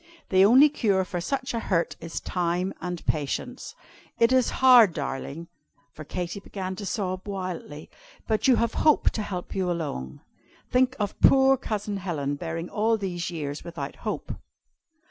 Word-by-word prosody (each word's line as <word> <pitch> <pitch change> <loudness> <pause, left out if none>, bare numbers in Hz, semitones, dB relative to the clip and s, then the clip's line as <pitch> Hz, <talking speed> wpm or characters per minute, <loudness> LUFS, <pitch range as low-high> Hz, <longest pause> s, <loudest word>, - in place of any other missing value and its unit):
The 190 0 +5
only 255 +8 +7
cure 200 -10 +1
for 180 -2 -4
such 260 +7 -2
a 230 - -1
hurt 170 -6 0
is 165 0 -5
time 180 +1 -1
and 180 -2 -5
patience. 155 - -3 0.4
It 230 +1 +4
is 260 -2 +3
hard, 245 -8 +6
darling" 145 +2 -5 0.5
for 155 - -9
Katy 175 +5 -4
began 190 -1 -6
to 200 - -5
sob 185 -3 -3
wildly 185 -6 -5 0.4
"but 220 +2 +1
you 260 - +6
have 230 -1 0
Hope 305 -1 +3
to 220 - -3
help 180 -4 -5
you 185 -2 -1
along. 145 - -4 0.5
Think 255 0 +3
of 205 -2 -3
poor 270 0 +6
Cousin 210 -5 -3
Helen, 155 -7 -3
bearing 165 +3 -4
all 220 +3 +1
these 180 -4 -3
years 150 -4 -5
without 150 -5 -6
hope!" - - -4
185 Hz, 160 wpm, -26 LUFS, 170-225 Hz, 0.5 s, only